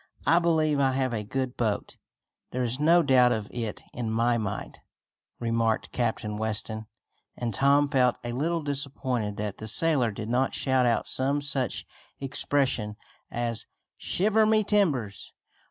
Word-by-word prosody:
"I 165 +3 +5
believe 155 -4 +2
I 135 -1 +3
have 130 -2 0
a 110 -2 -2
good 130 +4 -3
boat." 110 -4 -2 0.5
"There 125 0 -2
is 125 +2 -1
no 165 +3 +5
doubt 130 -3 +5
of 110 -3 -1
it 115 -3 -4
in 115 -2 -3
my 115 +2 +2
mind," 100 -2 -5 0.6
remarked 115 -1 0
Captain 110 -3 -2
Weston, 110 0 -3 0.5
and 120 -2 -2
Tom 140 +6 +4
felt 125 -3 +2
a 120 - -3
little 160 +6 -1
disappointed 130 -7 -2
that 105 -1 -4
the 110 - -7
sailor 135 +1 +2
did 110 +1 -6
not 125 +3 +1
shout 130 -2 +2
out 115 - +1
some 140 +2 0
such 140 -3 -2 0.3
expression 135 -5 +1 0.3
as 120 -1 -3 0.3
"Shiver 215 +3 +2
my 215 0 +4
timbers!" 145 - 0
125 Hz, 150 wpm, -27 LUFS, 110-145 Hz, 0.6 s, I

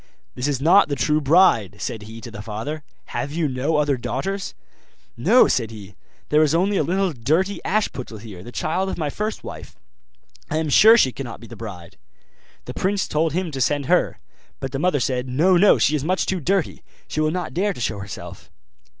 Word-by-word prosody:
'This 125 - -2
is 140 -3 -1
not 170 +5 +5
the 140 - 0
true 150 +2 +1
bride,' 135 - +4
said 110 +3 -4
he 110 +2 -10
to 115 0 -9
the 105 -2 -8
father; 115 +9 -5 0.3
'have 140 - -3
you 160 0 0
no 140 +4 -1
other 145 -2 +1
daughters?' 195 - -4 0.6
'No,' 210 - +5
said 115 -3 0
he; 105 -3 -11 0.4
'there 150 +1 +4
is 155 0 +3
only 195 +4 +2
a - - +3
little 185 +3 0
dirty 165 - 0
Ashputtel 140 - -2
here, 105 -6 -10
the 120 - -10
child 185 +8 -1
of - - -4
my 150 -4 -2
first 215 +5 -4
wife; - - -9 0.7
I - - -1
am 160 -1 -1
sure 220 +10 +7
she 130 - +4
cannot 125 -2 -7
be 115 - -12
the - - -11
bride.' 95 -7 -9 0.7
The - - -6
prince 195 +1 0
told 155 0 0
him 180 -1 -2
to 135 -2 -4
send 145 +2 +1
her. - - +2 0.4
But 135 - -5
the 135 - -3
mother 180 -3 +2
said, 125 0 -1
'No, 165 +9 +3
no, 195 +3 +6
she 150 - +2
is 145 - -2
much 185 +4 0
too 190 - -1
dirty; 185 +3 -1 0.3
she - - -4
will 155 0 +2
not 180 +2 -3
dare 200 +4 +1
to - - -11
show 110 -3 -2
herself. 100 -2 -9
150 Hz, 210 wpm, -22 LUFS, 125-180 Hz, 0.7 s, sure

